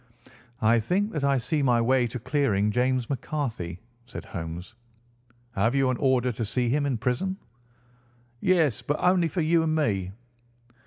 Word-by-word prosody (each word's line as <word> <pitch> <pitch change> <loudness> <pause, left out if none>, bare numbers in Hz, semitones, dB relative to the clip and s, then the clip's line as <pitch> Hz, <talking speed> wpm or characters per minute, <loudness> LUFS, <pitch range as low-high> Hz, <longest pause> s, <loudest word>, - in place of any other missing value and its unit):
"I 115 +2 +5
think 190 - 0
that 150 -3 -3
I 140 -1 +3
see 130 +5 -1
my 125 -3 +3
way 125 +1 +2
to 115 - -5
clearing 120 -5 +1
James 125 +1 +1
McCarthy," 120 - -4 0.3
said - - -8
Holmes. 85 +2 -7 0.8
"Have 115 +3 +1
you 135 -2 +3
an 125 - -2
order 130 -2 +2
to 115 0 -4
see 120 +3 -1
him 145 +3 +1
in 130 -4 0
prison?" 125 - -1 1.0
"Yes, 165 - +2
but 145 - -1
only 180 -1 +3
for 170 +2 -2
you 165 +1 +3
and 160 -1 0
me." 100 -12 0
130 Hz, 160 wpm, -26 LUFS, 115-150 Hz, 1.0 s, I